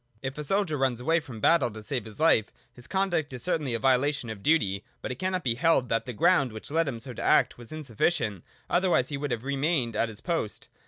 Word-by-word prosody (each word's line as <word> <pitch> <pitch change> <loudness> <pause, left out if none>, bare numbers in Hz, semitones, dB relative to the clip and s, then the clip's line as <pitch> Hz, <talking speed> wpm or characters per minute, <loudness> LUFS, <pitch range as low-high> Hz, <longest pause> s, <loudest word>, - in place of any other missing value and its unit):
If 135 0 -3
a - - -3
soldier 175 -1 0
runs 130 -3 +1
away 165 +7 +2
from 130 -8 -9
battle 165 +1 +4
to 110 0 -10
save 125 0 -3
his 110 +3 -9
life, 155 -9 +4 0.3
his 125 -1 -9
conduct 190 -6 0
is 125 - -1
certainly 150 -9 0
a - - -2
violation 135 -1 +1
of 105 -3 -8
duty: 100 -9 +2 0.2
but - - -5
it 125 - -6
cannot 185 -1 -1
be 120 - +2
held 135 -2 +2
that 115 +2 0
the - - -3
ground 155 - +3
which 110 +5 -8
led 165 +1 +2
him 130 -4 -3
so 125 +2 -7
to - - -7
act - - +3
was 120 - -11
insuffi 145 -8 0
cient, 105 - -2 0.3
otherwise 175 -8 +2
he 145 - -3
would 145 +1 -3
have 120 -2 -2
remained 140 -3 0
at 115 - +1
his 110 -1 -7
post. 165 - -3
135 Hz, 245 wpm, -27 LUFS, 115-165 Hz, 0.3 s, battle